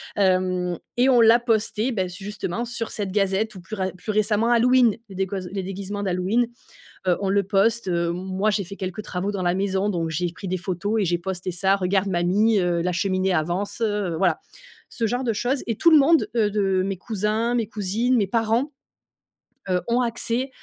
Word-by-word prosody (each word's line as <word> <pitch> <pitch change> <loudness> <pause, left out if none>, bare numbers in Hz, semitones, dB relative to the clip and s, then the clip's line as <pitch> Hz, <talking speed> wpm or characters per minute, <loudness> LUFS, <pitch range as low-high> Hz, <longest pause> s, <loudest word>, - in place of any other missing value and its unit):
Hem 185 -2 +1 0.2
et 255 +2 +4
on 245 -2 +5
l'a 230 +2 +6
posté, 225 0 0
beh, 190 -5 -1
justement 200 +3 -4
sur 230 -1 -4
cette 200 -3 -3
gazette 200 +2 0
ou 185 - -9
plus 215 +4 -7
ra 190 -1 -1
plus 215 - -4
récemment 215 +2 +1
Halloween, 240 -1 +4
les 190 - -10
déguos 190 -1 -3
les 195 -1 -3
déguisements 200 +2 -5
d'Halloween, 195 +6 +1 0.6
heu, 180 - +3
on 195 - -1
le 200 +1 +2
poste, 200 +3 +1
heu, 170 -1 +1
m - - -2 0.3
moi 215 - +3
j'ai 205 -2 -1
fait 200 +3 -9
quelques 185 +2 -5
travaux 195 0 -3
dans 190 -2 -3
la 175 0 +2
maison 195 +1 0
donc 165 -3 -1
j'ai 175 +2 -1
pris 190 +1 -8
des 185 - -1
photos 200 +5 -2
et - - +2
j'ai 175 0 0
posté 185 +1 -4
ça: 190 +3 +2
«Regarde 190 +1 0
mamie, 195 +5 +2
heu, 175 -1 +1
la 180 0 0
cheminée 185 +1 0
avance, 175 +8 -2
heu», 205 -5 0
voilà. 180 -3 +2 0.5
Ce 230 - -2
genre 245 +4 -1
de 230 - +1
choses 255 +5 -1
et 230 -3 -2
tout 335 - +4
le 310 - +8
monde, 315 +3 +4
heu, 210 -2 +3
de 195 -2 +1
mes 195 -1 -2
cousins, 215 +4 -1
mes 230 -3 0
cousines, 220 +5 0
mes 205 -4 +2
parents, 230 +7 0 1.0
heu, 180 -1 +1
ont 240 +2 +2
accès 240 +2 -1
200 Hz, 205 wpm, -23 LUFS, 185-225 Hz, 1.0 s, le